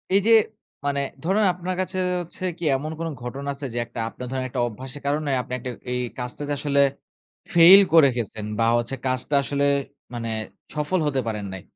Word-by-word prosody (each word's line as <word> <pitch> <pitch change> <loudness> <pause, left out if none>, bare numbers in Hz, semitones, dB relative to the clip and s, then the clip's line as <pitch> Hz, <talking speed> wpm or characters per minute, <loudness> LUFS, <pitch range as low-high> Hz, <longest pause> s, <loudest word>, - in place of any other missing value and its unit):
এইযে 200 +3 +4 0.5
মানে 140 0 +1 0.2
ধরুন 195 +5 +2
আপনার 180 +1 -4
কাছে 185 0 -4 0.2
হচ্ছে 175 +2 -9
কী 175 - -9
এমন 150 +4 -3
কোনো 165 -1 -2
ঘটনা 135 +4 -5
আছে? 140 +1 -7
যে - - -4
একটা 120 0 -8
আপনার 125 +2 -8
ধরেন 130 -1 -2
একটা 125 -1 -2
অভ্যাসের 130 +5 -8
কারণে 145 +1 0
আপনি 125 - -8
একটা 125 - -5 0.2
এই 125 0 0 0.2
কাজটাতে 140 +4 -4
আসলে 140 -1 +2 0.7
ফেইল 175 +3 +9
করে 160 -4 +8
গেছেন 110 -2 -4
বা 115 - +3
হচ্ছে 120 +2 -3
কাজটা 130 +3 -1
আসলে 140 +1 -1 0.5
মানে 115 -1 -3 0.5
সফল 150 +5 0
হতে 135 -2 +1
পারেন 105 -2 -3
নাই। 95 -1 -7
140 Hz, 180 wpm, -24 LUFS, 125-165 Hz, 0.7 s, ফেইল